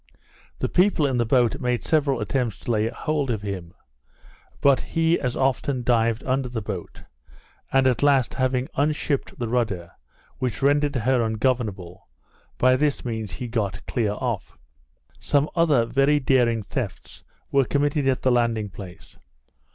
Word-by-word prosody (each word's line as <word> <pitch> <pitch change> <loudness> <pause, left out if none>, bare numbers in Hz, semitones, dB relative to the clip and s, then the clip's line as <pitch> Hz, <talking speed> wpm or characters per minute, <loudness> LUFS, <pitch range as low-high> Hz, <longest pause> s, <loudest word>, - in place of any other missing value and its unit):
The - - -1
people 180 -4 +3
in 135 -3 0
the 120 -2 +1
boat 125 +2 +2
made 125 -1 0
several 145 -4 +1
attempts 125 -7 -2
to - - -3
lay 110 0 +1
hold 150 0 -2
of 110 -4 -2
him; 95 -3 -6 0.8
but 140 -2 +4
he 165 +1 +1
as 125 -2 -2
often 135 -1 0
dived 115 -1 +1
under 130 -1 -1
the 120 -2 -3
boat, 95 -4 -7 0.7
and 135 0 +3
at 125 -3 +2
last 140 -4 +3
having 130 0 0
unshipped 145 -1 -1
the 120 - -3
rudder, 110 -8 -1 0.5
which 125 -1 -3
rendered 145 0 +2
her 125 +1 +2
ungovernable, 110 -5 -2 0.5
by 130 0 +4
this 145 0 0
means 110 -6 -4
he 125 - -5
got 100 -6 -3
clear 110 -4 -1
off. 110 -3 -4 0.6
Some 145 +1 +1
other 155 -9 +3
very 135 +5 +2
daring 120 -5 +2
thefts 100 -4 -6 0.3
were 140 -1 +4
committed 145 +4 0
at 130 -1 +1
the 130 - +3
landing 115 -3 +1
place. 95 -3 -12
125 Hz, 150 wpm, -24 LUFS, 110-140 Hz, 0.8 s, but